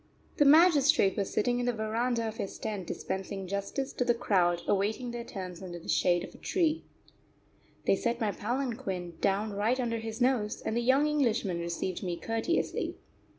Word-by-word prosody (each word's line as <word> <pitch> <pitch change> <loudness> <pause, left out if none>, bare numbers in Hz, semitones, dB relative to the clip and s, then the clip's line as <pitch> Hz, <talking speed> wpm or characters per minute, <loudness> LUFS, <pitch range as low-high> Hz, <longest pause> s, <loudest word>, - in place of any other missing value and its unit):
The 295 - +5
magistrate 290 - +6
was 200 -2 -2
sitting 245 +3 +1
in 245 - -1
the 245 - +2
verandah 230 +2 -1
of 220 0 -6
his 195 - -4
tent 200 -5 -4
dispensing 190 0 -4
justice 200 +8 -3
to - - 0
the 240 -1 +2
crowd 175 -6 +2
awaiting 215 +5 0
their 235 0 -5
turns 185 -5 -7
under 175 -2 -6
the 170 - -12
shade 175 -1 +2
of - - -9
a - - -15
tree. 325 -4 0 1.0
They - - +4
set 235 +4 -1
my 215 -3 +1
palanquin 225 -7 -3
down 200 +2 +1
right 220 +6 +1
under 230 -2 -1
his 225 0 -6
nose, 245 -4 +1
and 220 - -2
the 240 - +1
young 265 +4 +4
Englishman 235 - +1
received 170 +2 -3
me 175 -3 -3
courteously. 225 - -1
220 Hz, 180 wpm, -30 LUFS, 195-245 Hz, 1.0 s, magistrate